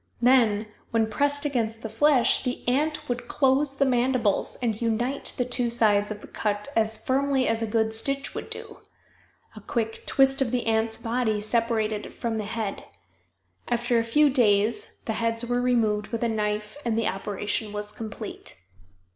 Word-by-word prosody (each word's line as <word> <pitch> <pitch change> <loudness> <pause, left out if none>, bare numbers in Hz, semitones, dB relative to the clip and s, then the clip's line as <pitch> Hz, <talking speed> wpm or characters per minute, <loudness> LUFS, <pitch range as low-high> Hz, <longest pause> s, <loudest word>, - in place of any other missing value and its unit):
Then, 235 -4 +4 0.2
when 225 -1 +1
pressed 285 +5 +1
against 230 -5 -1
the - - -2
flesh, 255 +3 +3
the 250 -1 -4
ant 300 +4 0
would 245 0 -3
close 275 0 +2
the 275 - +3
mandibles 250 -4 +1
and 225 -3 -2
unite 240 +4 0
the 250 - +1
two 245 -1 0
sides 210 -3 +3
of 210 -1 -6
the - - -11
cut 210 +3 -3
as 220 -1 +1
firmly 270 0 +1
as 225 0 0
a 225 - -1
good 220 0 +1
stitch 275 +5 -1
would - - -6
do - - -7
it. - - -31 0.7
A - - -10
quick 225 -3 -3
twist 270 0 +4
of 265 - +2
the 245 0 -1
ant's 225 0 +1
body 230 -2 -1
separated 220 -1 0
it - - -13
from 225 -2 -2
the 210 - -3
head. 220 -2 -4 0.8
After 240 0 +1
a - - +1
few 285 +6 +3
days 215 -3 +2
the 220 - -1
heads 230 +1 0
were 245 +1 0
removed 220 -4 +1
with 230 +2 -3
a - - +2
knife 210 +1 -2
and 230 -2 0
the 230 - +1
operation 205 +2 -2
was 210 0 -4
complete. 220 -1 -8
230 Hz, 180 wpm, -26 LUFS, 215-250 Hz, 0.8 s, Then